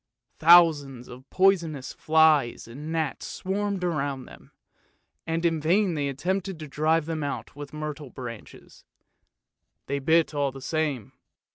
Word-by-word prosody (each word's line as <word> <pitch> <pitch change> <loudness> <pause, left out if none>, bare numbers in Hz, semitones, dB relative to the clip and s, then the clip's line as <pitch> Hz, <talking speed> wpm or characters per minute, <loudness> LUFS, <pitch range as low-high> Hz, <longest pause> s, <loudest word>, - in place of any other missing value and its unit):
Thousands 155 -7 +5
of 125 +2 -13
poisonous 170 -8 +1
flies 155 -7 +3
and 145 +7 -8
gnats 160 -3 -2
swarmed 200 0 -3
around 140 -6 -2
them, - - -15 0.8
and 165 +1 -1
in 165 -2 +1
vain 180 +4 +2
they 145 -3 -1
attempted 185 +6 -2
to 155 - -7
drive 155 +2 +1
them 160 -2 -3
out 140 -1 -5
with 145 -1 -8
myrtle 150 -2 -6
branches; 120 -3 -10 1.0
they 140 0 -2
bit 160 +3 +2
all 140 -2 0
the 135 - -10
same. 145 - -2
155 Hz, 135 wpm, -26 LUFS, 140-165 Hz, 1.0 s, Thousands